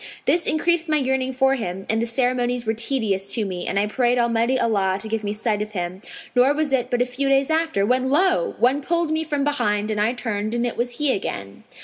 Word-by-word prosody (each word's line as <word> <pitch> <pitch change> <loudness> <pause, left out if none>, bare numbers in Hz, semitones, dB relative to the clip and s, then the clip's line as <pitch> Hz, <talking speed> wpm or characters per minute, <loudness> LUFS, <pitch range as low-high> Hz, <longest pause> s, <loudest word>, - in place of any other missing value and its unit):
This 345 - +2
increased 335 +2 +1
my 305 - +3
yearning 265 -1 0
for 265 +1 +2
him 195 -7 -4
and 220 +1 +1
the 235 - 0
ceremonies 245 0 0
were 220 - +1
tedious 220 -5 -1
to 220 -3 0
me 180 -2 -4
and 195 - -1
I 200 - +2
prayed 245 +3 +1
Almighty 235 +2 +1
Allah 195 -5 +1
to 220 - -3
give 220 0 -2
me 205 - -2
sight 210 0 -1
of 210 0 -5
him; 180 0 -4 0.3
nor 260 +4 +4
was 305 -2 -1
it 250 -2 +1
but 245 0 +2
a - - -4
few 260 +2 -2
days 275 +2 +2
after, 320 -11 +1
when 255 +3 +1
lo! 375 - +2
one 265 +4 +2
pulled 340 +2 0
me 315 0 0
from 290 -3 -2
behind, 215 -8 0
and 210 -1 -1
I 220 +3 +2
turned 220 -2 -3
and 240 0 0
it 240 - -2
was 245 0 -2
he 295 -3 +2
again. 100 - -5
245 Hz, 240 wpm, -22 LUFS, 215-275 Hz, 0.3 s, nor